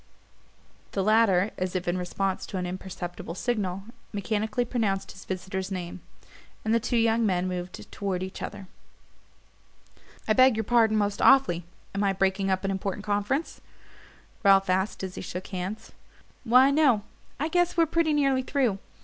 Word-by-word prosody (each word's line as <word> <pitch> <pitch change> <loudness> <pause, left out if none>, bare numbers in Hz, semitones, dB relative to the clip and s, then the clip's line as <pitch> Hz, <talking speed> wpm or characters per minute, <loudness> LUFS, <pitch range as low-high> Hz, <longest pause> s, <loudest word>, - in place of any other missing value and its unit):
The 195 - 0
latter, 215 -2 +4
as 185 0 -2
if 180 -1 -2
in 175 - +1
response 185 +1 -2
to 195 - -5
an 180 - -2
imperceptible 175 -2 -6
signal, 195 -4 -2 0.3
mechanically 215 +3 -1
pronounced 200 -5 -1
his 195 - -13
visitor's 190 +1 -4
name; 180 -1 -5 0.6
and 220 - +2
the 230 - +4
two 240 +1 -1
young 230 0 +3
men 185 -3 +1
moved 180 0 -6
toward 190 -3 -2
each 190 - -7
other. 200 -1 -6 1.6
"I 215 - +4
beg 255 0 +5
your 220 - 0
pardon 225 -1 +3
most 205 -1 0
awfully 265 -11 +5 0.3
am 200 +1 -1
I 195 -1 +2
breaking 195 +1 +1
up 190 0 0
an 195 - 0
important 195 +1 -3
conference?" 205 +9 -1 0.8
Ralph 195 -2 +5
asked 190 +2 -1
as 190 -1 -4
he - - -6
shook 180 +1 -6
hands. 195 +4 -5 0.5
"Why, 255 +4 +6
no 275 -8 +3 0.4
I 300 - 0
guess 350 +1 +1
we're 335 - +5
pretty 330 0 +1
nearly 275 -3 +2
through. 255 -7 0
200 Hz, 160 wpm, -27 LUFS, 185-230 Hz, 1.6 s, Why